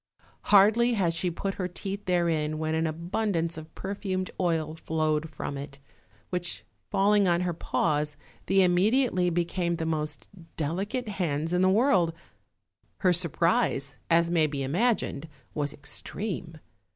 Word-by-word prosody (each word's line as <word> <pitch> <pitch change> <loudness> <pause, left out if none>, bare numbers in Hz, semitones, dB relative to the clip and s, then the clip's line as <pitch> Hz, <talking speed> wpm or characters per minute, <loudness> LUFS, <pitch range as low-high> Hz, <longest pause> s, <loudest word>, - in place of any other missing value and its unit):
Hardly 220 +4 +5
had 185 -6 +1
she 165 +2 0
put 195 +3 -3
her 180 - 0
teeth 195 +3 -5
therein 170 -4 +1
Avhen 155 0 -2
an 160 +1 +1
abun 170 +7 -1
dance 165 0 -1
of 155 0 -10
perfumed 190 -1 -3
oil 165 -4 0
flowed 155 -1 -1
from 140 -2 -5
it, 140 -1 -8 0.5
which 175 -1 -3 0.2
falling 200 0 +3
on 175 0 +3
her 180 -1 0
paws, 150 -2 -1 0.3
they 195 0 +5
immediately 185 +1 +3
became 170 0 0
the 165 -1 -3
most 150 -6 -2 0.3
delicate 195 - -2
hands 165 -5 -1
in 180 - +2
the 185 - +5
world; 190 -6 +3 0.9
her 180 -2 +4
surprise, 170 - +1
as 170 0 +4
may 160 -3 +3
be 140 -2 -3
imagined, 165 - 0 0.2
was 145 -1 -1
ex 145 -2 -6
treme. 185 -6 -5
170 Hz, 145 wpm, -28 LUFS, 155-195 Hz, 0.9 s, Hardly